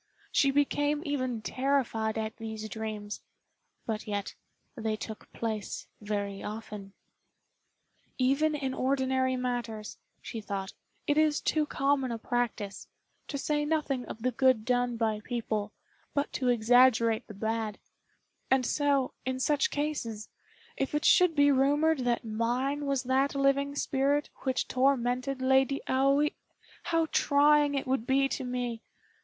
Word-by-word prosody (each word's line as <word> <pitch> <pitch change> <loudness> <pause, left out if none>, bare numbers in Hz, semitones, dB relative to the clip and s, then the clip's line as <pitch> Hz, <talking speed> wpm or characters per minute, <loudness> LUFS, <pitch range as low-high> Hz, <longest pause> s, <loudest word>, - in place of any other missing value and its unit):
She 275 - +4
became 290 +2 +1
even 255 -6 -2
terrified 255 -5 0
at 220 0 -3
these 220 -1 -6
dreams; 215 -1 -5 0.6
but 220 -1 -3
yet 205 -1 -3 0.4
they 220 -3 -1
took 215 0 -8
place 220 -3 -4 0.2
very 205 -1 -3
often. 210 -2 -7 1.2
"Even 275 +4 +2
in 270 -3 -2
ordinary 260 -1 +1
matters," 240 -4 -4 0.2
she 225 - -6
thought, 195 -1 -4 0.3
"it 290 +1 +2
is 305 -1 +3
too 305 -1 +1
common 275 -3 +1
a 230 - -2
practice, 230 -4 -3 0.4
to 280 - -4
say 295 +1 0
nothing 295 -4 0
of 220 - -8
the 255 - +2
good 255 -3 +3
done 245 -1 +1
by 220 -2 0
people, 220 -4 -2 0.4
but 285 0 0
to 255 - -1
exaggerate 235 -1 +4
the 215 - -10
bad; 220 0 -2 0.7
and 265 -1 +3
so, 280 -1 +1
in 260 0 -2
such 285 +1 +2
cases, 285 -8 -3 0.5
if 270 +2 -1
it 300 +2 0
should 360 -3 +5
be 285 -1 +5
rumored 290 +3 +3
that 240 -2 0
mine 250 +6 -1
was 275 -2 0
that 265 +2 +1
living 275 +1 +2
spirit 280 +1 0
which 260 -1 -1
tormented 255 0 +1
Lady 265 +1 +3
Aoi, 275 +3 +3 0.5
how 330 -1 +2
trying 290 0 +4
it 275 - -1
would 255 -3 -1
be 270 +1 +3
to 270 - -3
me! 245 -2 -3
260 Hz, 135 wpm, -29 LUFS, 225-280 Hz, 1.2 s, should